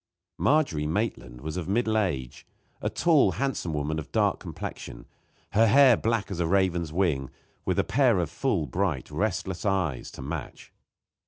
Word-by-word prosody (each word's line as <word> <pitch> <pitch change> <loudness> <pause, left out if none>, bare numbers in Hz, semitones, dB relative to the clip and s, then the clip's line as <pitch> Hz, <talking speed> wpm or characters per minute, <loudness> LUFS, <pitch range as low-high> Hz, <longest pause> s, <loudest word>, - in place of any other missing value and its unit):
Margery 135 - +2
Maitland 75 - -3
was 80 +4 -5
of 90 -1 -4
middle 110 +1 +1
age; 70 - -2 0.3
a - - 0
tall, 160 -5 +3
handsome 135 -11 -2
woman 75 +1 -2
of 75 - -9
dark - - +2
complexion, - - -7 0.5
her 110 +2 +4
hair 130 +2 +7
black 110 -1 -1
as 90 - -4
a 85 - +1
raven's 90 -3 +1
wing, 80 -7 0 0.4
with - - 0
a - - +3
pair 125 -5 +3
of 85 -3 -1
full, 90 - 0
bright, 80 -1 -2
restless 95 -3 -2
eyes 95 - -1
to - - -8
match. 75 -1 -7
90 Hz, 160 wpm, -27 LUFS, 75-110 Hz, 0.5 s, hair